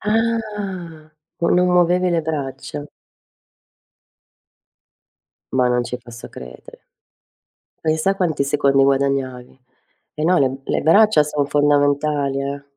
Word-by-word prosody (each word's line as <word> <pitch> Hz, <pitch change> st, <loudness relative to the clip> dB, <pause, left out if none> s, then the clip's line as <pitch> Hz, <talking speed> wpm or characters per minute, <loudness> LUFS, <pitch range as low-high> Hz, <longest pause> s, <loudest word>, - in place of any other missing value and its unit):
Ah. 210 Hz, -8 st, -3 dB, 0.3 s
No 170 Hz, -, +1 dB
non 180 Hz, 0 st, +3 dB
muovevi 180 Hz, +1 st, +3 dB
le 170 Hz, -1 st, +1 dB
braccia. 145 Hz, -2 st, -5 dB, 2.7 s
Ma 125 Hz, -1 st, +3 dB
non 125 Hz, 0 st, +1 dB
ci 125 Hz, +1 st, -5 dB
posso 120 Hz, -1 st, -11 dB
credere. 60 Hz, -1 st, -12 dB, 1.0 s
Pensa 160 Hz, +5 st, +1 dB
quanti 165 Hz, -7 st, 0 dB
secondi 140 Hz, -1 st, +2 dB
guadagnavi. 135 Hz, -2 st, -1 dB, 0.5 s
E 155 Hz, -, -4 dB
no, 180 Hz, +2 st, +3 dB
le 135 Hz, -, +3 dB
m 130 Hz, +1 st, -6 dB
le -, -, -1 dB
braccia 200 Hz, -1 st, +5 dB
son 145 Hz, -1 st, -1 dB
fondamentali, 145 Hz, -1 st, +1 dB
eh. 140 Hz, +1 st, -5 dB
145 Hz, 115 wpm, -20 LUFS, 135-175 Hz, 2.7 s, braccia